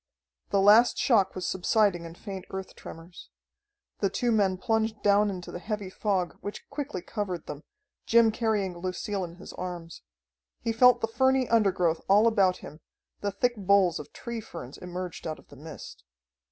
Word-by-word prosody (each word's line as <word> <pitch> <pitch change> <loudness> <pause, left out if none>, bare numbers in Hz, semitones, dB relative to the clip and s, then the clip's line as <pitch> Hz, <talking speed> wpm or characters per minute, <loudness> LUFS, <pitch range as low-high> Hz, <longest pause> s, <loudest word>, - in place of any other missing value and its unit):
The 200 - +2
last 210 +5 +6
shock 215 -7 +3
was 185 -1 -4
subsiding 190 -1 +1
in 165 0 -9
faint 195 -1 -7
earth 190 0 -6
tremors. 165 +2 -11 0.7
The 200 - +1
two 240 +5 0
men 195 -4 +2
plunged 220 0 -1
down 205 0 +4
into 180 -3 -6
the - - -6
heavy 205 -1 -4
fog, 190 -4 -1
which 205 0 -7
quickly 280 -11 -4
covered 190 -6 -4
them, 150 0 -7 0.5
Jim 230 -1 +5
carrying 210 -5 -1
Lucille 185 +3 -3
in 170 -1 -7
his - - -11
arms. 175 -2 -7 0.6
He 230 - -1
felt 245 +1 +6
the 225 - +1
ferny 260 +2 +2
undergrowth 190 -7 +2
all 205 +3 +6
about 195 -5 +3
him, 155 - -11 0.4
the 205 - -1
thick 240 +5 0
boles 195 -4 +3
of 150 - -9
tree 235 -1 -6
ferns 130 - -9
emerged 180 -1 -6
out 155 - -4
of - - -20
the - - -13
mist. 155 +3 -10
195 Hz, 170 wpm, -28 LUFS, 180-220 Hz, 0.7 s, last